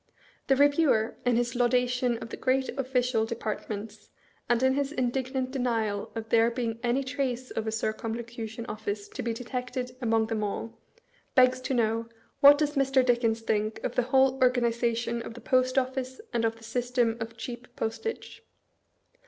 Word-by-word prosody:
The 270 - +5
Reviewer, 285 -5 +3
in 245 - +4
his 240 0 0
laudation 245 0 +2
of - - -8
the - - -5
great 260 0 0
ofB. 270 -2 -4
cial 245 -3 +2
departments, 215 -1 -5 0.4
and 240 +1 +3
in 260 0 +4
his 280 0 -1
indignant 260 -1 -1
denial 225 -6 -1
of 225 0 -5
there 230 0 +5
being 230 -2 -3
any 245 +3 +1
trace 260 -1 -3
of 225 0 -3
a - - 0
Circumlocution 225 +1 -4
OfB.ce 205 -1 -4
to - - -6
be 235 - -1
detected 250 +1 -4
among 225 -2 +2
them 220 -1 -2
all, 215 +2 -3 0.6
begs 255 0 +5
to 260 +1 -1
know, 230 0 0 0.2
" - - -39
What 285 +1 +9
does 295 -1 0
Mr. 270 -2 +3
Dickens 235 -2 +2
think 215 -1 -1
of - - -2
the - - +2
whole 265 0 +4
organization 235 -1 +1
of 230 - -8
the - - -8
Post 255 +2 +2
Of&ce 260 0 -1
and 230 -1 +1
of 225 0 0
the 225 - -17
system 240 0 0
of 225 +1 -6
cheap 240 +1 -7
Postage?" 225 - -4
240 Hz, 170 wpm, -28 LUFS, 225-255 Hz, 0.6 s, What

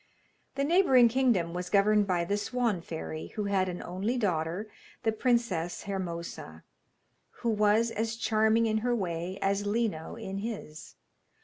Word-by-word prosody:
The 275 - 0
neighbouring 280 -7 +5
kingdom 225 -9 +2
was 180 0 -4
governed 210 0 +4
by 175 -2 +1
the 200 - 0
Swan 225 -3 -1
fairy, 160 -1 -6
who 210 - -1
had 195 -2 +1
an 180 - -5
only 195 +8 -2
daughter, 180 -1 -1 0.4
the 225 - +2
Princess 220 -8 0
Hermosa, 170 - -5 0.8
who 235 - +2
was 215 +2 +3
as 225 0 -2
charming 220 0 +2
in 220 -1 +1
her 245 +2 0
way 180 -2 -3
as 200 +1 0
Lino 205 -7 -1
in 195 +1 -5
his. 200 -8 -7
205 Hz, 145 wpm, -29 LUFS, 180-230 Hz, 0.8 s, neighbouring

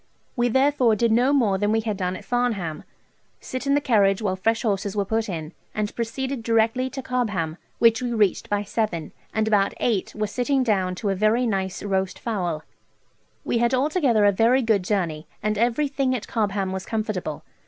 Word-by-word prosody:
We 240 -1 +2
therefore 265 -2 +3
did 230 +2 +1
no 245 +4 +4
more 220 -9 +2
than 205 +1 +1
we 225 0 +2
had 215 -2 -2
done 185 -1 -2
at - - -10
Farnham 215 -11 -1 0.5
sit 255 +2 -5
in 280 - +4
the - - +4
carriage 205 -8 +3
while 200 -4 -1
fresh 225 +4 0
horses 200 -2 -1
were 200 -1 0
put 220 +2 -1
in, 160 -2 -5 0.2
and 210 -1 -2
proceeded 255 +3 -3
directly 230 +3 +1
to 265 0 -6
Cobham, 205 -12 -1 0.2
which 230 0 +4
we 245 -1 -2
reached 210 -5 +1
by 205 0 0
seven, 200 -7 -2 0.2
and 220 0 0
about 205 -2 +2
eight 215 -6 0
were 215 0 -1
sitting 255 +5 0
down 190 -6 +1
to 205 +2 -2
a - - 0
very 215 +5 +2
nice 190 -4 -2
roast 190 -2 -1
fowl, 180 -9 -2
&c. - - -31 0.8
We - - 0
had 240 +2 +2
altogether 265 - +2
a 205 - +6
very 235 +6 +3
good 220 -4 +2
journey, 170 -6 -2 0.2
and 215 0 +1
everything 260 +3 +1
at 230 - -5
Cobham 200 -4 -1
was 190 0 -5
comfortable. 215 -8 -3
220 Hz, 195 wpm, -24 LUFS, 195-245 Hz, 0.8 s, a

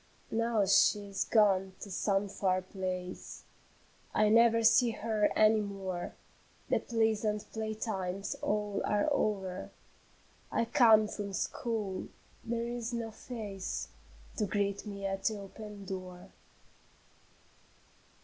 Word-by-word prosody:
Now 230 -2 +2
she 200 +1 +4
is 195 - -1
gone 195 -4 +3
to 200 - -7
some 195 +2 +1
far 185 -1 0
place; 185 -1 -5 0.7
I 215 - +4
never 230 +1 +5
see 240 +2 +6
her 215 -1 +1
any 215 0 +5
more, 195 -3 -4 0.5
The - - +3
pleasant 220 -2 0
play 220 -1 -3
times 195 -3 -3
all 210 -1 -1
are 210 +4 +1
o'er; 190 -7 -1 0.8
I 230 - +1
come 225 -4 +6
from 205 -2 -5
school, 210 -2 -2 0.4
there 235 0 -2
is 240 0 -4
no 230 -1 -3
face 210 -4 -5 0.5
To 210 - +1
greet 200 +1 -1
me 200 -1 -5
at 195 0 -3
the 220 - +1
open 205 0 -9
door. 185 -1 -7
210 Hz, 120 wpm, -32 LUFS, 195-220 Hz, 0.8 s, see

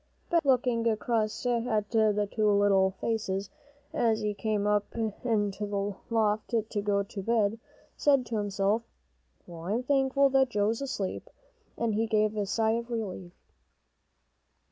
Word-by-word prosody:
Ben, 340 -1 +4
looking 245 -4 +2
across 220 0 -1
at 230 -3 0
the 210 -2 +2
two 215 -1 +1
little 200 -2 +4
faces, 200 -4 -2 0.4
as 225 -1 +1
he 210 -1 -1
came 210 -1 -1
up 205 0 0
into 215 -2 -1
the 200 0 -2
loft 220 0 +1 0.2
to 205 - -1
go 200 -1 +1
to 200 0 -7
bed, 225 0 +1 0.4
said 275 -3 +3
to 230 -2 -3
himself, 205 +1 0 0.6
"Well, 170 -1 -10
I'm 225 +6 0
thankful 275 0 +3
that 265 -1 +4
Joe's 215 +2 0
asleep." 250 -9 -4 0.5
And 230 -2 0
he 225 +2 0
gave 215 -1 +1
a 205 -2 -1
sigh 220 +2 +1
of 235 +1 -2
relief. 190 -6 -5
215 Hz, 145 wpm, -29 LUFS, 205-235 Hz, 0.6 s, Ben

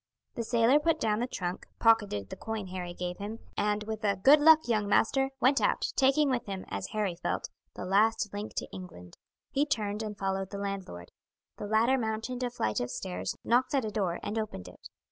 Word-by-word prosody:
The 235 - -3
sailor 235 +5 +4
put 325 +1 +1
down 215 -1 +1
the 245 - -1
trunk, 180 -6 -4
pocketed 205 - +2
the - - -4
coin 220 -4 -5
Harry 180 -1 -5
gave 180 +1 -4
him, 210 +3 -5 0.2
and 210 0 0
with 215 0 -5
a 200 -1 +2
"Good 275 +11 +6
luck, 315 -2 +7
young 215 -3 +1
master!" 270 +6 +3
went 270 +2 +4
out, - - +1
taking 275 +1 +3
with 245 -3 -1
him, 195 -1 -5
as 100 0 -4
Harry 205 -5 -2
felt, - - -2 0.3
the - - -6
last 210 +2 +2
link 205 +1 -5
to - - -3
England. 90 - -10 0.4
He 280 - +2
turned 215 -8 -1
and 210 -2 -5
followed 195 -1 -2
the 200 - -6
landlord. 195 - -5 0.5
The 205 - -5
latter 230 +5 +3
mounted 225 +2 -3
a 250 - 0
flight 110 - -1
of 120 - -2
stairs, 185 +5 -4
knocked 250 +4 +2
at 265 -4 +1
a 215 - -3
door, 190 -5 -1
and 220 +2 -2
opened 210 - -5
it. - - -13
215 Hz, 205 wpm, -30 LUFS, 190-240 Hz, 0.5 s, luck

